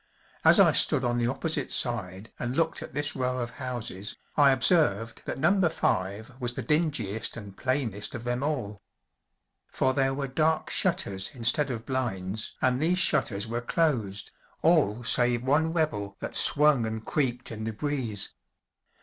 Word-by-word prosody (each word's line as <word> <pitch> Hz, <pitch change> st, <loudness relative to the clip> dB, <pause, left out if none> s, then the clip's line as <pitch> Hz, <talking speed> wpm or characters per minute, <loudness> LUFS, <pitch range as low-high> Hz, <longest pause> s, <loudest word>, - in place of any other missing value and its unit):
As -, -, +7 dB
I -, -, +7 dB
stood 130 Hz, -, +3 dB
on 120 Hz, 0 st, 0 dB
the 120 Hz, -, +1 dB
opposite 145 Hz, +2 st, -2 dB
side 110 Hz, -4 st, -1 dB
and 125 Hz, +2 st, -3 dB
looked 165 Hz, 0 st, 0 dB
at -, -, -9 dB
this 145 Hz, 0 st, -1 dB
row 125 Hz, -1 st, -1 dB
of 120 Hz, -1 st, -3 dB
houses, 120 Hz, -7 st, -5 dB, 0.2 s
I 145 Hz, -2 st, +6 dB
observed 130 Hz, -, +2 dB
that -, -, -4 dB
Number 175 Hz, +5 st, +3 dB
Five 100 Hz, -3 st, -2 dB
was 120 Hz, -2 st, -1 dB
the -, -, -4 dB
dingiest 150 Hz, -, -1 dB
and 100 Hz, -4 st, -9 dB
plainest 130 Hz, -5 st, -2 dB
of 115 Hz, -, -6 dB
them 120 Hz, +1 st, -2 dB
all. 120 Hz, -9 st, -3 dB, 0.9 s
For 130 Hz, -, 0 dB
there 135 Hz, 0 st, +1 dB
were 140 Hz, 0 st, -2 dB
dark 155 Hz, +4 st, 0 dB
shutters 135 Hz, -, 0 dB
instead 125 Hz, +5 st, +1 dB
of 115 Hz, -3 st, -5 dB
blinds, 110 Hz, -6 st, -3 dB
and 130 Hz, +1 st, +2 dB
these 175 Hz, +3 st, +2 dB
shutters 105 Hz, -, +2 dB
were 115 Hz, +2 st, -3 dB
closed, 120 Hz, -9 st, -1 dB, 0.3 s
all 140 Hz, -, +3 dB
save 120 Hz, 0 st, +2 dB
one 150 Hz, +5 st, +2 dB
rebel 105 Hz, -, -2 dB
that -, -, -6 dB
swung 145 Hz, -6 st, +5 dB
and 110 Hz, 0 st, -5 dB
creaked 125 Hz, -6 st, -1 dB
in 110 Hz, -1 st, -6 dB
the 110 Hz, -, -2 dB
breeze. 120 Hz, -4 st, -2 dB
125 Hz, 160 wpm, -27 LUFS, 110-145 Hz, 0.9 s, As